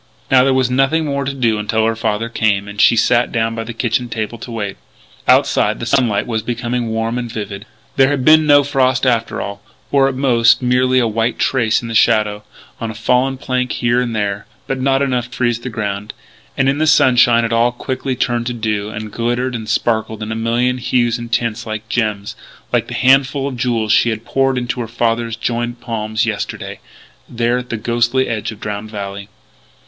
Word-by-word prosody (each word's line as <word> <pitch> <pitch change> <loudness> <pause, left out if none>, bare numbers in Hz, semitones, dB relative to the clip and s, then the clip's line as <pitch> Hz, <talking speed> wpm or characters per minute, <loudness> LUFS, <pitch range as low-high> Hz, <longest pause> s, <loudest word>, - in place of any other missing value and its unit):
Now 130 -1 +6
there 135 0 +3
was 130 -1 +1
nothing 135 +5 +2
more 140 -1 -2
to 140 - -1
do 115 -5 +1
until 110 +1 0
her 115 0 +1
father 110 0 -1
came, 105 -3 0
and 105 0 -3
she - - +6
sat 120 +2 +2
down 115 -1 0
by 115 0 -4
the 115 - -7
kitchen 120 +1 -1
table 110 +1 -4
to - - -9
wait. 105 -4 -4 0.5
Outside - - +3
the - - -4
sunlight 120 -4 +1
was 110 -2 -2
becoming 120 +1 -3
warm 115 +2 -2
and 120 -2 -5
vivid. 105 -1 -6 0.3
There 135 0 +5
had 140 -3 -1
been 155 0 +6
no 145 -1 +6
frost 130 -2 +1
after 115 -3 0
all 100 0 -6 0.3
or, 135 -1 +4
at 135 - -5
most, 125 -3 +4
merely 125 +1 +2
a 120 -2 +3
white 115 +2 -1
trace 120 -3 +1
in - - -5
the 115 - -5
shadow 105 -2 +2 0.4
on 115 - -3
a 110 - -7
fallen 125 +4 +1
plank 125 -1 -2
here 120 +1 +1
and 120 -2 -3
there 105 0 -2 0.2
but 135 - -3
not 135 +1 +2
enough 125 -3 0
to 120 - -11
freeze 120 -2 +1
the 125 - -6
ground. 105 -2 -4 0.4
And, 135 - +2
in 140 +2 +1
the 155 - +2
sunshine, 120 -5 +5
it 115 - -2
all 115 +1 +3
quickly 130 +1 -4
turned 120 -1 -1
to 125 - -2
dew, 105 -3 -2
and 105 0 -7
glittered 120 +3 -1
and 110 -2 -5
sparkled 110 -1 -1
in 110 - -5
a - - -2
million 120 +3 0
hues 120 -1 +1
and 120 0 -8
tints 120 -2 -1
like 110 0 -5
gems 105 -4 -2 0.4
like - - +1
that - - -5
handful 135 +1 +3
of 135 - -4
jewels 120 -3 -1
she 120 - +4
had 110 0 -4
poured 135 -1 +1
into 125 +1 -3
her 120 - -3
father's 115 0 -1
joined 120 +1 -3
palms 110 -1 -2
yesterday 110 -3 -4 0.5
there 120 +1 0
at 125 - -9
the 115 - -2
ghostly 120 +4 +1
edge 110 -1 -3
of 110 - -11
Drowned 105 0 -5
Valley. 100 -1 -6
120 Hz, 210 wpm, -17 LUFS, 110-125 Hz, 0.5 s, Now